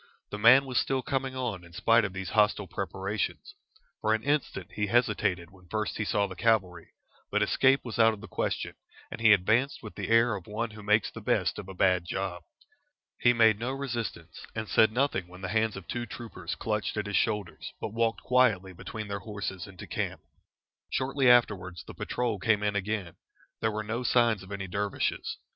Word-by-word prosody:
The 105 Hz, -, -4 dB
man 130 Hz, +5 st, +7 dB
was 130 Hz, -2 st, +1 dB
still 135 Hz, -1 st, 0 dB
coming 135 Hz, 0 st, -2 dB
on 120 Hz, -8 st, -3 dB
in 85 Hz, 0 st, -15 dB
spite 115 Hz, +6 st, +4 dB
of 100 Hz, -, -3 dB
these 95 Hz, -1 st, -5 dB
hostile 105 Hz, -1 st, +3 dB
preparations. 105 Hz, -, -4 dB, 0.5 s
For 110 Hz, 0 st, +3 dB
an 110 Hz, -, -4 dB
instant 140 Hz, -, -1 dB
he 105 Hz, -1 st, -1 dB
hesitated 100 Hz, -6 st, +1 dB
when 90 Hz, -2 st, -19 dB
first 110 Hz, +1 st, -2 dB
he 110 Hz, -, -1 dB
saw 105 Hz, 0 st, +1 dB
the 95 Hz, -2 st, -7 dB
cavalry, 90 Hz, -4 st, +1 dB, 0.4 s
but -, -, +2 dB
escape 135 Hz, +1 st, +3 dB
was 120 Hz, -1 st, -5 dB
out 115 Hz, 0 st, +7 dB
of -, -, -15 dB
the -, -, -10 dB
question, -, -, -2 dB, 0.4 s
and -, -, -7 dB
he 110 Hz, -1 st, +7 dB
advanced 110 Hz, +8 st, +3 dB
with 105 Hz, -, -8 dB
the -, -, -5 dB
air 115 Hz, 0 st, +5 dB
of 95 Hz, -3 st, -6 dB
one 110 Hz, +2 st, -3 dB
who 105 Hz, 0 st, -11 dB
makes 105 Hz, +1 st, +2 dB
the -, -, -9 dB
best -, -, 0 dB
of 95 Hz, -, -8 dB
a 95 Hz, -, -8 dB
bad 90 Hz, -1 st, +3 dB
job. 90 Hz, -1 st, -3 dB, 0.8 s
He 120 Hz, -, +5 dB
made 110 Hz, -3 st, +4 dB
no 125 Hz, +3 st, -2 dB
resistance, 120 Hz, -, -5 dB
and 110 Hz, -1 st, -3 dB
said 110 Hz, +1 st, +4 dB
nothing 120 Hz, -7 st, 0 dB
when 90 Hz, +1 st, -13 dB
the 95 Hz, -, -4 dB
hands 110 Hz, +1 st, +1 dB
of 95 Hz, -, -10 dB
two 120 Hz, 0 st, -3 dB
troopers 95 Hz, -7 st, -6 dB
clutched 105 Hz, -1 st, -2 dB
at 105 Hz, -, -1 dB
his 100 Hz, 0 st, -3 dB
shoulders, 105 Hz, -5 st, -1 dB
but 105 Hz, -, -5 dB
walked 115 Hz, 0 st, 0 dB
quietly 110 Hz, -7 st, +3 dB
between 105 Hz, +4 st, -7 dB
their 100 Hz, 0 st, -3 dB
horses 100 Hz, -2 st, -5 dB
into 95 Hz, -2 st, -10 dB
camp. -, -, -3 dB, 0.7 s
Shortly 135 Hz, 0 st, +2 dB
afterwards 95 Hz, -8 st, +3 dB
the -, -, -9 dB
patrol 120 Hz, -4 st, -2 dB
came 105 Hz, +2 st, +2 dB
in 105 Hz, -1 st, 0 dB
again. 100 Hz, -3 st, -3 dB, 0.4 s
There 110 Hz, -, +1 dB
were 110 Hz, 0 st, -3 dB
no 115 Hz, +3 st, -3 dB
signs 120 Hz, -4 st, +3 dB
of 95 Hz, +1 st, -12 dB
any 100 Hz, -1 st, -4 dB
dervishes. 100 Hz, +2 st, -2 dB
105 Hz, 200 wpm, -29 LUFS, 95-115 Hz, 0.8 s, man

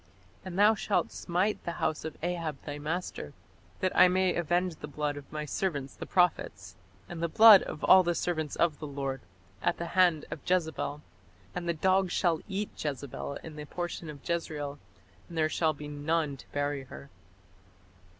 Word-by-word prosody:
And 185 Hz, -1 st, -6 dB
thou 210 Hz, +2 st, +6 dB
shalt 210 Hz, -1 st, 0 dB
smite 185 Hz, +4 st, -1 dB
the 170 Hz, -, -3 dB
house 155 Hz, -2 st, -1 dB
of 160 Hz, -, -6 dB
Ahab 165 Hz, -4 st, -2 dB
thy 145 Hz, 0 st, -5 dB
master, 165 Hz, +5 st, -4 dB, 0.5 s
that 185 Hz, -1 st, 0 dB
I -, -, +8 dB
may 185 Hz, 0 st, +2 dB
avenge 175 Hz, 0 st, 0 dB
the 150 Hz, -, -7 dB
blood 150 Hz, 0 st, -2 dB
of 145 Hz, -1 st, -10 dB
my 150 Hz, 0 st, -4 dB
servants 145 Hz, -5 st, -2 dB
the -, -, -7 dB
prophets, 105 Hz, -, +1 dB, 0.3 s
and 170 Hz, -1 st, -7 dB
the 170 Hz, -, +1 dB
blood 215 Hz, +2 st, +9 dB
of -, -, -7 dB
all 185 Hz, -, +8 dB
the 175 Hz, -1 st, 0 dB
servants 160 Hz, -4 st, -2 dB
of 165 Hz, -3 st, +1 dB
the 150 Hz, -, -5 dB
Lord, 135 Hz, -2 st, -4 dB, 0.4 s
at -, -, +1 dB
the 170 Hz, -, -3 dB
hand 175 Hz, -4 st, +4 dB
of -, -, -4 dB
Jezebel.... 160 Hz, -4 st, -1 dB, 0.5 s
And 175 Hz, -1 st, -3 dB
the -, -, +2 dB
dogs 185 Hz, +2 st, +2 dB
shall 170 Hz, -4 st, +2 dB
eat 200 Hz, +1 st, -2 dB
Jezebel 140 Hz, -1 st, -4 dB
in 160 Hz, -2 st, -9 dB
the 150 Hz, -, -6 dB
portion 175 Hz, 0 st, -5 dB
of 145 Hz, -2 st, -10 dB
Jezreel, 150 Hz, -4 st, -3 dB, 0.5 s
and 170 Hz, -, -8 dB
there 155 Hz, -1 st, +2 dB
shall 160 Hz, -1 st, +1 dB
be 150 Hz, 0 st, -8 dB
none 150 Hz, 0 st, -1 dB
to -, -, -15 dB
bury 145 Hz, -1 st, -2 dB
her." 140 Hz, +1 st, -11 dB
160 Hz, 180 wpm, -30 LUFS, 145-180 Hz, 0.5 s, blood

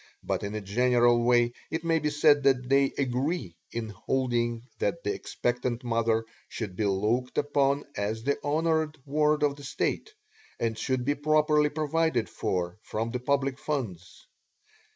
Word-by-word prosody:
but -, -, -1 dB
in 100 Hz, +1 st, -4 dB
a 110 Hz, -, -3 dB
general 120 Hz, +3 st, +3 dB
way 120 Hz, 0 st, +3 dB, 0.2 s
it 160 Hz, +1 st, -3 dB
may 165 Hz, -1 st, +2 dB
be 150 Hz, 0 st, 0 dB
said 150 Hz, -1 st, +4 dB
that 130 Hz, -2 st, +2 dB
they 135 Hz, +1 st, +4 dB
agree 130 Hz, -, -1 dB, 0.2 s
in 115 Hz, -2 st, -4 dB
holding 120 Hz, +1 st, -1 dB, 0.2 s
that -, -, -1 dB
the 410 Hz, -, 0 dB
expectant 125 Hz, -, -2 dB
mother 115 Hz, -1 st, +1 dB, 0.2 s
should 105 Hz, -6 st, -5 dB
be 105 Hz, -, 0 dB
looked 110 Hz, +6 st, 0 dB
upon 140 Hz, 0 st, +2 dB
as 110 Hz, +2 st, -2 dB
the 140 Hz, +2 st, +1 dB
honored 160 Hz, +1 st, +1 dB
ward 150 Hz, +1 st, +2 dB
of 145 Hz, -1 st, +2 dB
the 145 Hz, -, -11 dB
State, 145 Hz, -, -2 dB, 0.5 s
and 115 Hz, -1 st, 0 dB
should 130 Hz, +2 st, -1 dB
be 145 Hz, -, +2 dB
properly 150 Hz, 0 st, +3 dB
provided 155 Hz, -4 st, 0 dB
for 90 Hz, +1 st, -2 dB
from 110 Hz, +1 st, -3 dB
the 125 Hz, -, -2 dB
public 135 Hz, +1 st, 0 dB
funds. 105 Hz, -, -4 dB
130 Hz, 155 wpm, -28 LUFS, 115-150 Hz, 0.5 s, said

